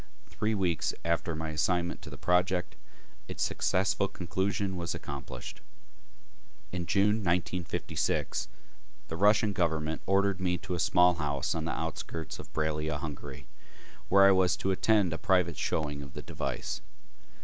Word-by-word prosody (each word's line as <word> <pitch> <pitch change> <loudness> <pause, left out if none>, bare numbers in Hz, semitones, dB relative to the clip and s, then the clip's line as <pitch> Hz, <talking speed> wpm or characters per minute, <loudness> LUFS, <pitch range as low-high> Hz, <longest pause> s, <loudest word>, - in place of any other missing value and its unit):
Three 110 +1 -1
weeks 90 -5 0
after 85 0 0
my 80 0 -3
assignment 85 +3 0
to - - -9
the - - -9
project, 90 0 +1 0.5
its - - -2
successful 95 +2 +1
conclusion 95 +2 -2
was 85 -1 -2
accomplished. 70 -2 -7 1.1
In 90 -1 -3
June 105 +1 +3
1956, 90 -3 -1 0.6
the 80 - -3
Russian 105 +3 +4
government 80 -3 0
ordered 100 0 +3
me 90 -1 +1
to 95 0 -5
a 90 - -1
small 90 +2 +5
house 70 -5 -1
on 80 -1 -3
the 80 - -1
outskirts 80 -1 -5
of - - -10
Braila, 75 -1 -1
Hungary, 70 -3 -7 0.6
where 100 +1 +7
I 100 - +8
was 95 -2 +3
to 95 - 0
attend 100 -2 +3
a 85 - -4
private 90 -3 +2
showing 75 -2 -1
of 70 -1 -10
the - - -6
device. - - -4
90 Hz, 145 wpm, -30 LUFS, 80-95 Hz, 1.1 s, I